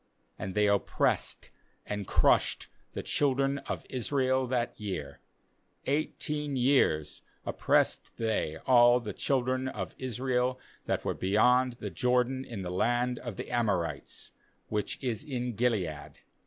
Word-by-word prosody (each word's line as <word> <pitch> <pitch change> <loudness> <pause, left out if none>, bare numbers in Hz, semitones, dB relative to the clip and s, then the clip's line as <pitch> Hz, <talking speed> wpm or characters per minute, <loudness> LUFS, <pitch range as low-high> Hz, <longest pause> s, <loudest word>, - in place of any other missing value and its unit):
8And 95 -1 -5
they 105 0 +4
oppressed 100 -1 0 0.3
and 105 -1 -4
crushed - - +2 0.2
the - - -4
children 140 0 +1
of - - -3
Israel 130 0 0
that 120 -1 0
year; 95 -9 -5 0.7
eighteen 150 0 -1
years 125 - +2 0.2
[oppressed - - +2
they] 110 -9 -1
all 120 -1 +6
the 105 -4 -5
children 130 +1 0
of - - -4
Israel 130 0 0 0.3
that - - -1
were - - +1
beyond 125 +6 +3
the 120 - -6
Jordan 125 +1 +1
in 110 -7 -6
the 90 - -4
land 120 +6 +1
of 120 -5 -6
the - - -6
Amorites, 95 - -1 0.4
which 105 -1 -2
is 125 +1 -1
in 125 -5 -3
Gilead. 100 -10 -1
125 Hz, 130 wpm, -30 LUFS, 105-130 Hz, 0.7 s, all